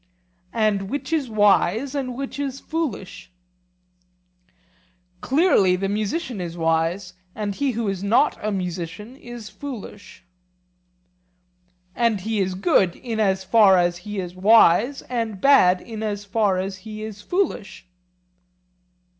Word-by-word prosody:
And 210 -3 +1
which 285 +5 -4
is 290 -6 0
wise 215 +4 +2
and 260 -4 -3
which 275 +1 -6
is 275 -1 -3
foolish? 235 - -5 1.9
Clearly 265 - +3
the 195 +1 -2
musician 215 - -2
is 170 -1 -6
wise, 165 +3 0 0.2
and 205 -2 -3
he 275 +4 -1
who 230 -1 -2
is 195 -1 -3
not 225 +8 +3
a 215 - -1
musician 180 +4 -5
is 240 -4 -10
foolish. 230 -9 -9 1.7
And 230 -5 +1
he 220 +2 -2
is 190 -1 -1
good 185 -1 +2
in 230 -3 -5
as 190 -3 +1
far 195 -1 +5
as 175 0 +1
he 205 +3 -6
is 180 -2 -5
wise, 220 +5 +4
and 225 -5 -3
bad 185 -10 +5
in 220 -2 -8
as 205 -2 -3
far 200 -2 +1
as 190 +1 -3
he 215 +2 -8
is 215 -1 -7
foolish? 245 - -2
210 Hz, 130 wpm, -23 LUFS, 190-240 Hz, 1.9 s, far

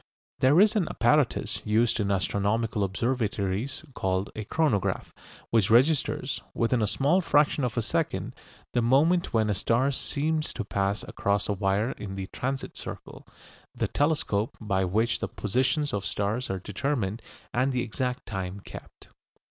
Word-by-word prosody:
There 140 +6 +5
is 210 +2 +5
an 190 -7 +2
apparatus 135 +2 +1
used 115 +2 +2
in 100 -1 0
astronomical 100 +3 0
observatories 110 +3 -1
called 95 -1 -1
a 110 - -5
chronograph, 135 - 0 0.4
which 110 -4 +3
registers, 130 +2 +2
within 115 +1 +1
a 105 - +2
small 145 - +2
fraction 150 -4 +3
of 120 -3 -2
a 115 - +2
second, 105 - -1 0.4
the 120 - +2
moment 150 +9 +3
when 110 -2 +2
a 105 - +1
star 120 +7 +1
seems 155 +3 -1
to 115 - -4
pass 100 0 -1
across 100 0 0
a 105 - +1
wire 100 +4 0
in 95 -2 -7
the 95 -1 -4
"transit 135 +1 -3
circle," - - -8 0.5
the - - 0
telescope 140 -8 0
by 100 -3 0
which 110 +6 +1
the - - -2
positions 130 +7 0
of 100 -1 -1
stars 105 +7 -1
are 95 - -1
determined 105 +2 -2 0.3
and 130 +2 +2
the 125 -1 0
exact 125 +3 -3
time 95 -2 -4
kept. - - -12
115 Hz, 155 wpm, -27 LUFS, 100-135 Hz, 0.5 s, There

